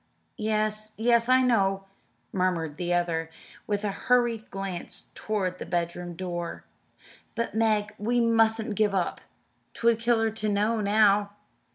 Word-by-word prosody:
"Yes, 215 0 -1
yes, 235 +1 +3
I 255 0 +5
know," 195 -6 +2 0.5
murmured 170 -5 -1
the 175 0 -2
other, 170 -2 0 0.4
with 205 0 -1
a 205 - 0
hurried 240 0 +1
glance 195 -3 -5
toward 190 -4 -2
the - - -5
bedroom 175 0 -3
door. 175 -1 -5 0.7
"But, 230 -2 -2
Meg, 215 -2 +1
we 235 +4 +1
mustn't 225 -2 +2
give 205 -1 +1
up 180 -3 -1 0.5
'twould 230 -1 +2
kill 235 0 +2
her 225 0 +1
to 215 -1 -2
know 210 +2 +1
now. 205 -1 +3
210 Hz, 140 wpm, -27 LUFS, 185-225 Hz, 0.7 s, I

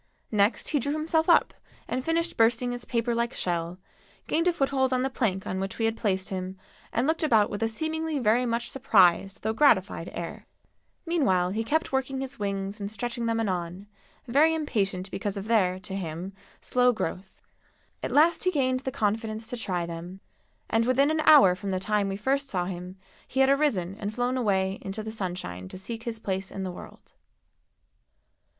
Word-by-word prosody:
Next 210 +1 +2
he 295 - +2
drew 285 +3 -1
himself 320 +2 +1
up 340 - +5 0.3
and 255 +1 -2
finished 335 +2 0
bursting 235 +2 +3
his 245 -1 -4
paper 235 0 0
like 235 0 -1
shell, 170 0 -2 0.5
gained 330 +2 +1
a - - +5
foothold 270 -4 +1
on 255 0 +1
the 265 - -1
plank 195 -7 -1
on 190 - -3
which 195 0 -4
we 225 - +1
had 225 0 +1
placed 190 -4 -1
him 185 0 -4 0.3
and 235 - +1
looked 320 +2 0
about 225 -10 +3
with 205 - -4
a, 225 - +2
seemingly, 315 +6 -2
very 240 -1 +3
much 235 +1 -2
surprised 195 -6 +3
though 220 +1 0
gratified 215 - +3
air. 170 -1 -7 0.6
Meanwhile 215 - +2
he 220 +3 -1
kept 310 +8 0
working 265 0 -1
his 270 -1 -6
wings 200 0 -3
and 200 - -3
stretching 235 +2 -3
them 230 0 0
anon, 185 -2 -2 0.4
very 295 +6 +4
impatient 200 -11 -2
because 200 +1 -3
of 200 +2 -5
their, 190 -5 +3
to 190 0 -7
him, 180 +1 -5 0.3
slow 250 0 +3
growth. 190 -3 -5 0.6
At - - -2
last 320 +3 +4
he - - +5
gained 260 -6 +1
the 265 0 -4
confidence 220 0 -1
to - - -2
try 180 -7 -2
them, 170 +3 -7 0.5
and 225 +1 +1
within 275 +4 +3
an 315 - 0
hour 280 -12 +8
from 185 +2 -5
the 185 -1 0
time 205 +1 0
we 195 - -3
first 275 +5 0
saw 180 -2 -1
him 180 +1 -6 0.3
he 265 - 0
had 265 - +5
arisen 275 - +2
and 205 0 -3
flown 245 +3 -1
away 195 -5 0
into 195 +3 -5
the 220 - -5
sunshine 175 - -5
to - - -9
seek 225 +4 -7
his 230 -1 -3
place 190 -3 -3
in 195 - -5
the 185 - -3
world. 175 - -12
220 Hz, 190 wpm, -27 LUFS, 190-260 Hz, 0.6 s, hour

